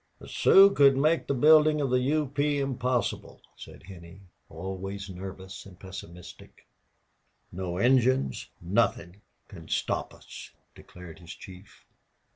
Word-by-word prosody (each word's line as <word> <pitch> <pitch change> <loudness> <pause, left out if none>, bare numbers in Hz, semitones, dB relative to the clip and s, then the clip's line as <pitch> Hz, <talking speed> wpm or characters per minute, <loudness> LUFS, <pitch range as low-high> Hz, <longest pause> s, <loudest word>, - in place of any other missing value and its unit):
"The - - -14
Sioux 195 +1 +6
could 140 -4 +4
make 155 +4 +1
the 140 - -1
building 155 +3 +5
of 140 -3 -1
the 125 - +3
U. 150 +4 0
P. 145 +1 -1
impossible," 130 -3 -2 0.2
said - - -13
Henney, 85 0 -13 0.3
always 95 +3 -7
nervous 95 +1 -9
and 90 -2 -16
pessimistic. 90 -2 -12 0.9
"No 90 -1 -5
Indians 125 - +1
nothing 95 -1 -1 0.3
can - - -13
stop - - -3
us!" - - -12 0.2
declared 90 -2 -14
his 85 -2 -11
chief. 95 +1 -15
100 Hz, 125 wpm, -27 LUFS, 90-140 Hz, 0.9 s, Sioux